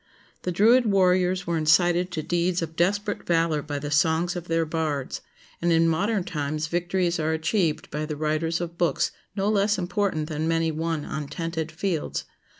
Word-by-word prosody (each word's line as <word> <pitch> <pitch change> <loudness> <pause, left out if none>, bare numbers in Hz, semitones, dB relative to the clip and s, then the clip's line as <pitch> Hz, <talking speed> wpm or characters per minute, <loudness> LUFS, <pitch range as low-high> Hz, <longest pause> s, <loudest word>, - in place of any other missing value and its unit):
The 180 - -2
Druid 225 +7 +5
warriors 185 -2 +3
were 170 -1 0
incited 175 +3 +3
to 160 -3 -4
deeds 175 +2 0
of 160 0 -6
desperate 205 +4 0
valor 165 -3 +2
by 145 0 -4
the 145 +1 -5
songs 160 +4 +2
of 175 -1 -6
their 165 0 +1
bards; 155 -4 -2 0.4
and 170 0 +2
in 165 0 +4
modern 195 +5 +1
times 155 -2 -2
victories 175 +1 0
are 160 +1 0
achieved 160 0 0
by 150 0 -3
the 155 - -3
writers 155 +2 0
of 170 -1 -6
books 175 - +1 0.2
no 195 0 0
less 210 0 +2
important 180 -3 -1
than 155 0 -2
many 165 0 +1
won 160 -1 -2
on 150 -2 -4
tented 165 0 -4
fields. 170 -1 -2
165 Hz, 175 wpm, -25 LUFS, 155-180 Hz, 0.4 s, Druid